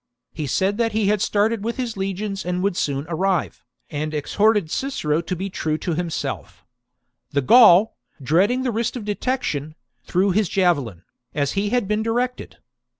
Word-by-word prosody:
He 155 -2 -4
said 195 - 0
that 225 -2 +1
he 210 -2 +1
had 210 -1 +1
started 210 +1 +1
with 235 +3 -3
his 245 -3 -3
legions 195 +1 -3
and 180 +1 -2
would 200 -2 0
soon 140 -3 -1
arrive, 180 +1 -1 0.3
and 155 +1 -3
exhorted 200 +3 +1
Cicero 165 - -1
to 180 +2 -4
be 190 +3 -4
true 155 -5 -2
to 170 - -3
himself 140 - -4 0.6
The 140 -2 0
Gaul, 220 - +7 0.2
dreading 190 - +2
the 255 - 0
risk 230 +2 -2
of 235 -5 -6
detection, 205 - -2 0.3
threw 190 +2 +1
his 200 -1 +1
javelin, 140 - 0 0.3
as 145 -2 0
he 200 +1 -1
had 245 -3 0
been 210 +1 0
directed. 240 +3 -2
195 Hz, 165 wpm, -22 LUFS, 155-220 Hz, 0.6 s, Gaul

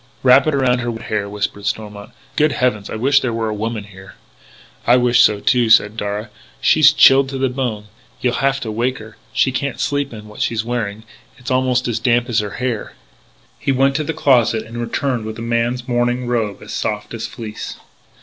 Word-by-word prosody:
"Wrap 130 +3 +6
it 155 - +2
around 130 -2 +2
her 120 0 -2
wet 115 -1 -7
hair," 105 -2 -1
whispered 105 0 -3
Stormont. 105 -1 -4 0.3
"Good 150 -1 +2
heavens, 115 -5 -1
I - - -5
wish 135 +5 +3
there 130 -3 -2
were 115 -1 -2
a - - -2
woman 110 0 -3
here." 95 -3 -14 0.7
"I 120 +2 +6
wish 125 -1 +4
so 105 -1 +4
too," 120 +1 +2
said 110 -1 +5
Darragh; 105 0 -4 0.3
"she's 150 -1 +6
chilled 135 -2 +6
to 135 - -4
the 135 0 +1
bone. 125 -5 -3 0.3
You'll 125 -1 0
have 135 0 +1
to 110 - -4
wake 120 +4 -1
her. 110 0 -12
She 130 - +2
can't 130 +1 -3
sleep 145 -1 -1
in 105 -2 -10
what 105 - -10
she's 115 -1 -1
wearing; 110 -3 -3 0.3
it's 125 -1 -7
almost 130 -1 +1
as 115 -2 -1
damp 120 +1 +1
as 115 - +2
her 105 -2 -4
hair 125 -4 -3 0.3
" - - -34
He - - 0
went 135 +1 +2
to 155 - -1
the 150 - -2
closet 120 -7 +2
and 115 +1 -8
returned 120 +1 -2
with 110 0 -6
a 115 - -6
man's 120 +1 -1
morning 120 0 0
robe, 115 -5 -2
as - - -8
soft - - -3
as - - -4
fleece. 105 -2 -7
120 Hz, 210 wpm, -19 LUFS, 110-130 Hz, 0.7 s, Wrap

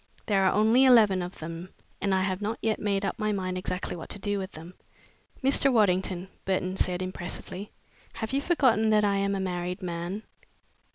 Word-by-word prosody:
There 200 -3 +2
are 185 - +4
only 220 +5 +4
eleven 220 -8 +6
of 180 +1 -6
them 165 +3 -7 0.3
and 200 - 0
I 190 0 +2
have 190 0 -2
not 215 +2 -2
yet 220 -1 0
made 200 -1 0
up 195 - -3
my 215 -1 0
mind 185 -2 -2
exactly 185 0 -3
what 165 - -8
to - - -4
do 205 0 -2
with 190 +1 -6
them." 165 +3 -10 0.7
"Mr. 275 +1 +4
Waddington," 190 -4 +2 0.2
Burton 185 -1 -1
said 180 -1 0
impressively, 185 +2 -6 0.4
"have 220 +2 -5
you 275 - +2
forgotten 255 - +3
that 215 -1 +4
I 200 -1 +2
am 200 0 0
a - - -2
married 180 0 -3
man?" 175 +4 -4
195 Hz, 190 wpm, -28 LUFS, 185-215 Hz, 0.7 s, eleven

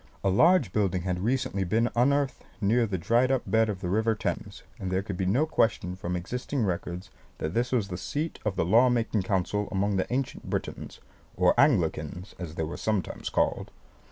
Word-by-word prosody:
A 95 - +3
large 160 - +4
building 95 -4 +1
had 90 -1 -1
recently 110 -2 0
been 115 +6 +1
unearthed 140 +2 +2 0.2
near 115 +3 +2
the 95 -2 -2
dried 120 +9 +2
up 130 -2 +1
bed 110 0 +2
of 100 -2 -4
the 90 - -3
river 110 +4 +1
Thames; - - -4 0.2
and 95 - -3
there 95 +1 0
could 100 -2 -5
be 90 +1 -1
no 125 +11 +3
question 110 - 0
from 90 -1 -4
existing 125 +8 -3
records 90 0 -4 0.3
that 80 - -3
this 120 +1 0
was 115 -6 +1
the 90 - -4
seat 150 - -3
of 105 -3 -1
the - - +1
law 115 +8 +5
making 115 -3 +1
council 95 +2 -1
among 100 0 0
the 95 - -1
ancient 130 +1 -3
Britons - - -4 0.4
or - - +4
Anglicans, 90 - +1
as 85 -3 -6
they 80 - -1
were 80 - -4
sometimes 105 -4 -2
called. - - 0
105 Hz, 195 wpm, -27 LUFS, 90-120 Hz, 0.4 s, law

